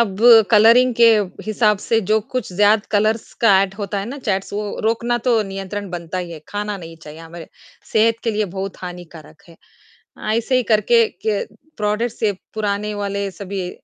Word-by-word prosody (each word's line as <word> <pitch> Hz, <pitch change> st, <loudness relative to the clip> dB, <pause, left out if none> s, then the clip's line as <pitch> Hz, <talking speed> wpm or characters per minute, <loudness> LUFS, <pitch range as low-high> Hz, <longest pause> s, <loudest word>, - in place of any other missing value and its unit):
अब 200 Hz, -5 st, 0 dB, 0.3 s
कलरिंग 230 Hz, +3 st, +5 dB
के 230 Hz, -1 st, +8 dB, 0.4 s
हिसाब 210 Hz, -1 st, +2 dB
से, 225 Hz, +2 st, 0 dB
जो 215 Hz, +2 st, +1 dB
कुछ 225 Hz, -3 st, -5 dB
ज़्यादा 205 Hz, +2 st, +3 dB
कलर्स 215 Hz, +2 st, 0 dB
का 200 Hz, -5 st, +5 dB
एड 195 Hz, -1 st, -4 dB
होता 200 Hz, 0 st, -3 dB
है 195 Hz, -, -4 dB
ना, 275 Hz, +4 st, -7 dB
चैट्स 195 Hz, -7 st, -3 dB
वो 205 Hz, 0 st, -4 dB
रोकना 235 Hz, +2 st, 0 dB
तो 230 Hz, -3 st, +3 dB
नियंत्रण 195 Hz, 0 st, -6 dB
बनता 175 Hz, +1 st, -5 dB
ही 175 Hz, -2 st, -5 dB
है। 155 Hz, -, -9 dB
खाना 205 Hz, 0 st, -4 dB
नहीं 165 Hz, -2 st, -11 dB
चाहिए, 150 Hz, +1 st, -11 dB
हमारे 165 Hz, 0 st, -11 dB, 0.4 s
सेहत 225 Hz, +1 st, +3 dB
के 230 Hz, -, +1 dB
लिए 215 Hz, 0 st, -1 dB
बहुत 195 Hz, 0 st, -4 dB
हानिकारक 170 Hz, -4 st, -10 dB
है। 165 Hz, -, -16 dB, 0.8 s
ऐसे 255 Hz, +3 st, 0 dB
ही 255 Hz, -, +2 dB
करके 225 Hz, +2 st, +4 dB, 0.2 s
क 210 Hz, -2 st, 0 dB, 0.3 s
प्रोडक्ट्स 210 Hz, +3 st, -2 dB
से 215 Hz, -2 st, +2 dB, 0.2 s
पुराने 210 Hz, 0 st, -2 dB
वाले 200 Hz, -1 st, -3 dB
सभी 185 Hz, 0 st, -5 dB
205 Hz, 180 wpm, -19 LUFS, 190-220 Hz, 0.8 s, के